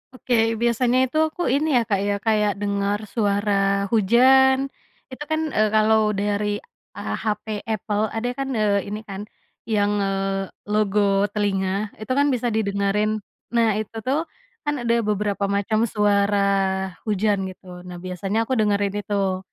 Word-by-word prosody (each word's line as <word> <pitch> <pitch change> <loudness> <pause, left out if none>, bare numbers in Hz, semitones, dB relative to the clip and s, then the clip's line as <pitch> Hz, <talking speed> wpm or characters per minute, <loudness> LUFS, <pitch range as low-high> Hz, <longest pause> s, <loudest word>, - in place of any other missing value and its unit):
Oke, 230 -3 +1
biasanya 240 +1 +2
itu 310 - -2
aku 335 +3 -7
ini 300 +3 +1
ya 240 - +5
Kak 200 -2 +2
ya 205 - +1
kayak 210 -2 +2
dengar 200 0 0
suara 205 -2 +1 0.4
hujan. 260 +5 +5 0.5
Itu 275 +3 -6
kan, 315 0 +1
eee, 215 0 +4
kalau 220 0 +4 0.2
dari 205 +1 -1 0.8
hape 215 0 -2
Apple 215 -1 -1
ada 230 +2 -1
kan, 270 - -1
eee, 205 -2 +1
ini 210 +1 -4
kan, 195 +1 -5 0.5
yang, 205 -2 +1
eee, 195 0 -1 0.2
logo 205 -1 +2
telinga 200 0 -1
itu 215 +4 -6
kan 285 - +4
bisa 245 0 -1
didengerin. 210 +1 0 0.4
Nah 230 -1 +4
itu 220 +1 -6
tuh, 280 +4 +2 0.4
kan 295 0 -1
ada 235 0 +2
beberapa 205 -1 -1
macam 215 +2 0
suara 205 -1 +2 0.7
hujan 205 0 +1
gitu 185 0 -11 0.2
nah 180 - -7
biasanya 185 +3 -3
aku 260 - -8
dengerin 205 -1 +1
itu. 195 -3 -1
210 Hz, 145 wpm, -23 LUFS, 200-225 Hz, 0.8 s, ya